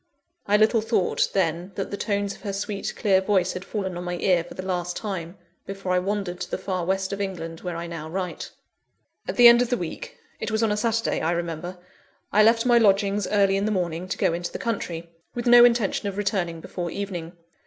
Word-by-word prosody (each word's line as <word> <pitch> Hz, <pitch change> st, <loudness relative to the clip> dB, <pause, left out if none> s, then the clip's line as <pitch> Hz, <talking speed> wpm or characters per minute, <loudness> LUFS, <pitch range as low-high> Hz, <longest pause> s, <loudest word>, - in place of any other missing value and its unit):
I 205 Hz, +1 st, +4 dB
little 220 Hz, +1 st, +4 dB
thought, 220 Hz, -4 st, +1 dB
then, 180 Hz, 0 st, -1 dB
that 195 Hz, -, -4 dB
the -, -, -2 dB
tones 200 Hz, -1 st, -1 dB
of -, -, -15 dB
her 200 Hz, -2 st, -4 dB
sweet, 200 Hz, 0 st, -3 dB
clear 195 Hz, -4 st, +3 dB
voice 190 Hz, -2 st, +1 dB
had 185 Hz, -, -6 dB
fallen 190 Hz, -3 st, -4 dB
on 175 Hz, -, -5 dB
my 175 Hz, 0 st, -3 dB
ear 175 Hz, -2 st, +2 dB
for -, -, -12 dB
the 185 Hz, -, -6 dB
last 180 Hz, -1 st, -2 dB
time, 185 Hz, -4 st, -5 dB, 0.3 s
before 195 Hz, -1 st, -4 dB
I 180 Hz, -, +3 dB
wandered 195 Hz, -2 st, -3 dB
to -, -, -5 dB
the -, -, -2 dB
far 185 Hz, -2 st, -3 dB
West 190 Hz, +1 st, -1 dB
of 200 Hz, -, -3 dB
England 165 Hz, -4 st, -5 dB
where 180 Hz, -2 st, -4 dB
I 170 Hz, -, -4 dB
now 165 Hz, -2 st, -6 dB
write. 180 Hz, +1 st, -4 dB, 0.8 s
At -, -, -3 dB
the 245 Hz, -1 st, +9 dB
end 235 Hz, 0 st, +8 dB
of 245 Hz, -, 0 dB
the 245 Hz, -, +1 dB
week 170 Hz, -2 st, -6 dB, 0.2 s
it 220 Hz, -, -3 dB
was 220 Hz, +1 st, 0 dB
on 220 Hz, -, +2 dB
a -, -, +1 dB
Saturday, 230 Hz, +1 st, 0 dB
I 160 Hz, -, 0 dB
remember 170 Hz, +1 st, -4 dB, 0.6 s
I 215 Hz, -, +6 dB
left 230 Hz, +2 st, +4 dB
my 240 Hz, -1 st, +5 dB
lodgings 200 Hz, -1 st, +2 dB
early 200 Hz, -2 st, +3 dB
in 200 Hz, -, 0 dB
the 215 Hz, -, 0 dB
morning, 175 Hz, -2 st, -2 dB
to 190 Hz, -, -3 dB
go -, -, +2 dB
into 175 Hz, +1 st, -3 dB
the -, -, -5 dB
country; 175 Hz, -7 st, -3 dB, 0.3 s
with 240 Hz, 0 st, -3 dB
no 240 Hz, 0 st, +8 dB
intention 235 Hz, -4 st, +2 dB
of 195 Hz, -, -8 dB
returning 190 Hz, -5 st, -1 dB
before 175 Hz, 0 st, -5 dB
evening. 175 Hz, -3 st, -5 dB
195 Hz, 230 wpm, -25 LUFS, 175-210 Hz, 0.8 s, the